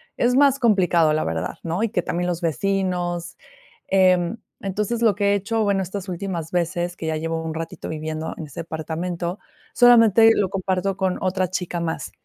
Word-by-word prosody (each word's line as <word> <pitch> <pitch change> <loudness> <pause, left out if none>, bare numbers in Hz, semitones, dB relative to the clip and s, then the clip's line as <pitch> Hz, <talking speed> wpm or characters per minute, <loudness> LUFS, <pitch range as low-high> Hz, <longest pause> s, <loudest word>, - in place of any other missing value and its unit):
Es 245 +1 +2
más 280 -1 +4
complicado, 180 - +3
la 155 +1 0
verdad, 80 0 -3
¿no? 170 +5 -2
Y 230 - +1
que 200 -4 0
también 175 +1 -2
los 175 -2 -1
vecinos 175 0 -1 0.5
em, 185 +1 +3 0.2
entonces, 210 +4 -2
lo 220 -4 +4
que 200 -1 +2
he - - +3
hecho, 220 +3 -1
bueno, 200 -2 +1
estas 190 +2 -6
últimas 175 -3 -4
veces, 175 0 -1
que 160 - -6
ya 160 0 -1
llevo 165 +1 -3
un 160 - -4
ratito 165 0 -6
viviendo 155 0 -4
en 160 - -6
ese 145 - -7
departamento, 170 +3 -4 0.3
solamente 230 -2 +6
lo 200 - +1
comparto 190 0 -1
con 190 -1 -1
otra 185 -1 0
chica 180 -2 -3
más. 165 -1 -3
180 Hz, 180 wpm, -22 LUFS, 165-200 Hz, 0.5 s, solamente